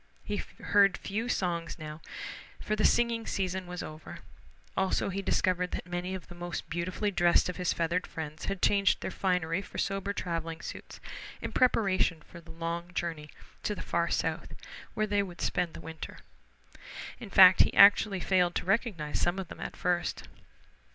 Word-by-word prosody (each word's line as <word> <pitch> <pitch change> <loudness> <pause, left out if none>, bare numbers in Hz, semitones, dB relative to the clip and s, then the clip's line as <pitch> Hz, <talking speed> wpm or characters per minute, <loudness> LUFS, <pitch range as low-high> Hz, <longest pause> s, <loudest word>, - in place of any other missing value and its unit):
He - - -3
heard 200 -2 +2
few 225 +5 -3
songs 170 -5 -1
now, 155 0 -8 0.6
for 215 - -1
the 215 - -1
singing 235 -1 +2
season 185 -1 -2
was 180 0 -5
over. 155 0 -9 0.5
Also 190 +1 +1
he 195 +1 -2
discovered 180 -2 +1
that - - -3
many 180 +1 -3
of 185 - -7
the - - -10
most 175 0 -5
beautifully 185 +5 -1
dressed 175 -1 +3
of 180 - -4
his 180 -2 0
feathered 170 +2 0
friends 155 -1 -6
had 195 -1 -4
changed 200 -1 +4
their - - -3
finery 180 -2 0
for - - -10
sober 195 0 -1
traveling 165 -3 -3
suits - - -8 0.4
in - - -5
preparation 195 -9 +2
for 170 - -13
the 165 - -18
long 170 +1 -4
journey 160 -3 -3 0.3
to 210 - -2
the - - -6
far 170 0 0
South - - -2 0.4
where 215 - +1
they 205 -1 +1
would 180 -3 -7
spend 175 -2 -1
the - - -7
winter. 160 -1 -8 1.0
In 230 -5 -8
fact 185 -1 +8
he - - +4
actually 200 -1 +7
failed 180 -2 +2
to - - -1
recognize 190 -7 0
some 175 +2 +1
of 190 -3 -5
them - - -9
at - - -5
first. 175 -1 -1
180 Hz, 175 wpm, -30 LUFS, 170-195 Hz, 1.0 s, fact